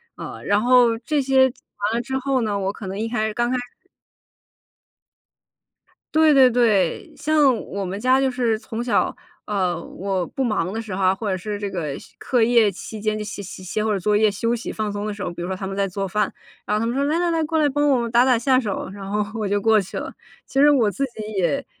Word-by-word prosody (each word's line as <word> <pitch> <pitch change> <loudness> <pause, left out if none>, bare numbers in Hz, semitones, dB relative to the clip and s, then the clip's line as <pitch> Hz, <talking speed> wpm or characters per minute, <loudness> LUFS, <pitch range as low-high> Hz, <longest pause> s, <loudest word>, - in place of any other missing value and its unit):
啊， - - -8
然 205 0 +2
后 245 -1 +4
这 285 +5 0
些 265 -1 +4
做 - - -28 0.3
完 - - -1
了 235 - 0
之 265 +1 -3
后 265 -1 0
呢， 210 -3 -1
我 195 0 -2
可 210 -2 -8
能 190 +1 -5
一 225 - -1
开 220 -2 -1
始 215 - -4
刚 240 +1 0
开 255 - +1
始 - - -2 2.5
对 315 -1 +5
对 265 -2 +7
对， 215 -8 +1
像 290 -2 +3
我 200 +1 -4
们 190 +2 -4
家 255 +3 +3
就 270 -1 +1
是 240 -3 0
从 225 +1 -6
小， 240 - +1 0.3
呃， 185 -4 -1
我 190 -1 -3
不 265 - -3
忙 205 -7 0
的 225 +2 -3
时 210 -4 -6
候 195 - -2
啊， 185 0 +4
或 205 +2 -4
者 190 - 0
是 205 +3 -5
这 200 -1 -3
个 160 -7 -3 0.2
课 250 -2 0
业 225 -2 +4
期 215 +3 -8
间 215 0 0
就 215 - -4
写 205 0 -6
写 185 0 -9
写 190 +4 -2
会 220 - 0
儿 200 - 0
作 210 +3 +1
业 215 0 +4
休 230 +4 -1
息 235 - -5
放 215 -1 -3
松 205 +1 -4
的 215 - -3
时 205 - -9
候。 180 - -3
比 175 - -7
如 175 - -3
说 190 - -2
他 190 +1 -5
们 195 - -5
在 200 0 0
做 195 +1 -3
饭， 210 +3 -1 0.3
然 - - -1
后 - - 0
他 225 - 0
们 235 +2 -1
说： 275 - +1
“来 330 - +1
来 350 0 +1
来， 325 -1 +1
过 320 +1 0
来 300 - +4
帮 290 +2 +1
我 270 - +4
们 235 -1 -2
打 235 +1 +5
打 255 -3 +3
下 255 +2 +3
手。” 210 -6 -3
然 200 -1 -8
后 210 +2 -2
我 210 - -1
就 205 +1 0
过 220 0 +4
去 195 - -7
了， - - -6 0.3
其 270 - -2
实 295 +1 +7
我 245 -7 +3
自 275 +7 -3
己 235 -3 -9 0.2
也 275 +10 0
220 Hz, 280 characters per minute, -22 LUFS, 200-255 Hz, 2.5 s, 对